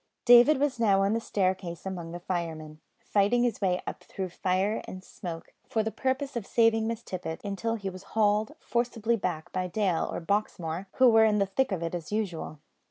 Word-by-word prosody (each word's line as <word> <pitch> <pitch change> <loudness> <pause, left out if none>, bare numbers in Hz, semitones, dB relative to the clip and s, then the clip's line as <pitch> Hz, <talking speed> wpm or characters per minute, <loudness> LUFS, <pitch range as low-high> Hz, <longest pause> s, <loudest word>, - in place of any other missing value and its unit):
David 245 +4 +7
was 275 -4 0
now 200 -4 +4
on 200 +2 +2
the 230 - +1
staircase 185 -5 -2
among 175 -3 -5
the 175 - -6
firemen, 160 -4 -4 0.2
fighting 210 +4 +2
his 240 -3 -1
way 185 -2 +1
up - - -6
through 190 -1 -5
fire 185 +4 0
and 185 0 -8
smoke, 170 -3 -8 0.2
for 220 - +1
the 220 - -2
purpose 265 +2 -2
of 230 -5 -4
saving 225 -1 +3
Miss 230 0 -3
Tippet, 175 -3 -5
until 215 +3 -2
he 200 -3 -5
was 185 0 -10 0.2
hauled 215 +4 +2
forcibly 235 -1 0
back 175 -5 -3
by 185 -1 -2
Dale 185 -2 0
or - - -3
Baxmore 180 -1 -2
who 260 - +6
were 225 -2 +6
in 210 -1 +3
the 200 - +3
thick 260 +6 0
of 180 -3 -2
it 165 - -3
as 170 -1 -5
usual. 190 -7 -3
200 Hz, 200 wpm, -28 LUFS, 180-225 Hz, 0.2 s, David